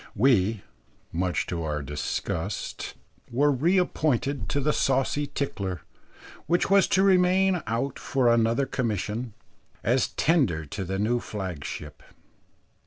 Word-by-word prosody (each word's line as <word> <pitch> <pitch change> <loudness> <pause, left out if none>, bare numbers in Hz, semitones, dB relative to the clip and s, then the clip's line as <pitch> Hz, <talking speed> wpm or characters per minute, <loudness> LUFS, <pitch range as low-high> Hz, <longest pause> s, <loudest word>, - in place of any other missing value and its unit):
We, 110 -3 +3 0.5
much 90 +1 -1
to 85 -2 -3
our 75 -2 -2
disgust, 75 +1 -4 0.3
were 145 +5 +3
reappointed 145 -3 +1
to 145 - 0
the 150 +2 +1
saucy 135 +2 +1
Tickler, 100 -12 -3 0.7
which 175 +3 +1
was 200 -1 +6
to 190 - +3
remain 185 -1 +4
out 120 +5 -2
for 130 -3 +1
another 115 +3 +3
commission, 115 -2 -2 0.5
as 125 +2 +2
tender 130 - +1
to 95 +7 -5
the 95 +1 -3
new 115 +4 +1
flagship. 90 -8 -6
120 Hz, 115 wpm, -26 LUFS, 95-145 Hz, 0.7 s, was